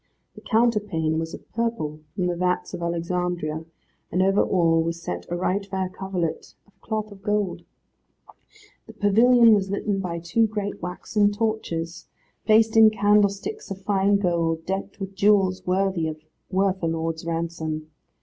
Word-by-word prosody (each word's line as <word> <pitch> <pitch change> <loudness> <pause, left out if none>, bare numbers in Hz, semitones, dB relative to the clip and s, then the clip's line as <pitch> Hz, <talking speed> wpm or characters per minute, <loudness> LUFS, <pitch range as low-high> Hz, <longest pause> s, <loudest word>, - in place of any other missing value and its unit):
The - - -13
counterpane 210 -9 +1
was 160 0 -4
of - - -15
purple 225 -10 -2 0.2
from 180 - -1
the 175 -1 0
vats 180 +1 -1
of 175 - -5
Alexandria, 170 -2 -2 0.5
and 180 +2 +2
over 195 +1 +3
all 165 -3 +3
was 165 +1 -2
set 90 - -5
a 175 - -2
right 185 +3 0
fair 190 -2 -3
coverlet 185 -3 -4
of 205 - -31
cloth 215 -1 -3
of 195 -1 -13
gold. 205 -2 -1 1.3
The 225 - -11
pavilion 225 +3 +5
was 195 -2 +1
litten 200 0 -1
by 175 -3 -3
two 170 +7 +1
great 205 -1 -4
waxen 205 +4 0
torches, 205 -6 -3 0.4
placed 220 +1 +4
in 220 -1 +8
candlesticks 205 - +1
of 195 0 -7
fine 200 0 +2
gold, 165 -4 0
decked 195 +2 -4
with 195 0 -5
jewels 195 -2 +3
worth 190 +1 +2
a 165 +4 -2
lord's 165 0 -2
ransom. 165 -2 -3
190 Hz, 150 wpm, -24 LUFS, 170-205 Hz, 1.3 s, in